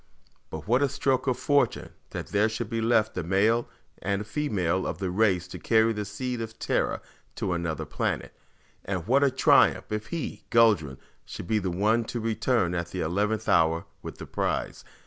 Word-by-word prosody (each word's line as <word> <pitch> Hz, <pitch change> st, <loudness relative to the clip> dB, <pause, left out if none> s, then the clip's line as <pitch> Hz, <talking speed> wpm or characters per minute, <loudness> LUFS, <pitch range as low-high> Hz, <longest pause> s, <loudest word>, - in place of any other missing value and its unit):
But 80 Hz, +3 st, -7 dB
what 125 Hz, +4 st, +3 dB
a 140 Hz, -, +3 dB
stroke 130 Hz, 0 st, 0 dB
of 130 Hz, -, +1 dB
fortune 145 Hz, -1 st, +1 dB, 0.2 s
that -, -, -6 dB
there 105 Hz, +2 st, +2 dB
should 110 Hz, +2 st, -4 dB
be 115 Hz, 0 st, -1 dB
left 110 Hz, -1 st, +2 dB
a -, -, -2 dB
male 105 Hz, +7 st, +2 dB, 0.3 s
and 100 Hz, +3 st, -1 dB
female 100 Hz, -, -1 dB
of -, -, -3 dB
the 95 Hz, -3 st, -3 dB
race 95 Hz, -3 st, +2 dB
to -, -, -8 dB
carry 115 Hz, 0 st, +3 dB
the 105 Hz, -1 st, -3 dB
seed 120 Hz, +4 st, -4 dB
of 110 Hz, 0 st, -6 dB
Terra -, -, -1 dB, 0.3 s
to 90 Hz, -, -1 dB
another 85 Hz, -3 st, -2 dB
planet. -, -, -2 dB, 0.5 s
And 95 Hz, -4 st, -3 dB
what 135 Hz, +6 st, +3 dB
a 140 Hz, -, +5 dB
triumph 130 Hz, -4 st, +4 dB
if 105 Hz, 0 st, -3 dB
he, 170 Hz, -2 st, -4 dB
Guldran, 105 Hz, -, +3 dB, 0.3 s
should -, -, -8 dB
be 110 Hz, +4 st, +1 dB
the 95 Hz, -2 st, -2 dB
one 105 Hz, +6 st, +1 dB
to 120 Hz, -, -4 dB
return 110 Hz, -4 st, 0 dB
at 85 Hz, -1 st, -2 dB
the 90 Hz, +1 st, -5 dB
eleventh 105 Hz, +6 st, -1 dB
hour 80 Hz, 0 st, +3 dB, 0.2 s
with -, -, -8 dB
the -, -, -8 dB
prize. -, -, -2 dB
105 Hz, 185 wpm, -27 LUFS, 90-115 Hz, 0.5 s, a